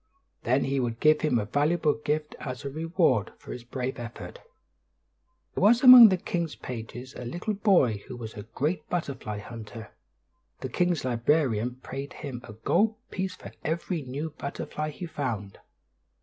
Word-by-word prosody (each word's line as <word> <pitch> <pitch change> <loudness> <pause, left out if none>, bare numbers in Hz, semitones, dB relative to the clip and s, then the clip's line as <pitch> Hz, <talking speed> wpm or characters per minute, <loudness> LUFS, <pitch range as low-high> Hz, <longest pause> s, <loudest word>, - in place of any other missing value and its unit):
Then 125 +4 +2
he 135 0 0
would 120 -2 -2
give 155 0 +4
him 150 -6 +2
a 105 - -1
valuable 150 +6 +2
gift 150 +1 -2
as 125 -1 -6
a 140 - -3
reward 160 - +1
for - - -11
his 125 - -7
brave 125 +1 -4
effort. 120 - -8 1.1
There - - -3
was 235 +5 +5
among 250 -3 +12
the 185 - +2
king's 170 -2 -3
pages 125 +2 -7
a - - -8
little 175 - -3
boy 185 - +3
who 125 - -7
was 110 -2 -7
a 105 - -7
great 150 - -3
butterfly 140 -11 -3
hunter. 110 +1 -9 0.7
The - - -4
king's 175 -5 0
librarian 125 -1 +1
paid 135 +2 -6
him 135 -5 -7
a 110 - -10
gold 210 - +1 0.2
piece 185 -1 -3
for - - -11
every 165 +1 -2
new 140 +4 -5
butterfly 150 +2 -5
he 155 +4 -7
found. 115 - -4
140 Hz, 165 wpm, -27 LUFS, 120-165 Hz, 1.1 s, among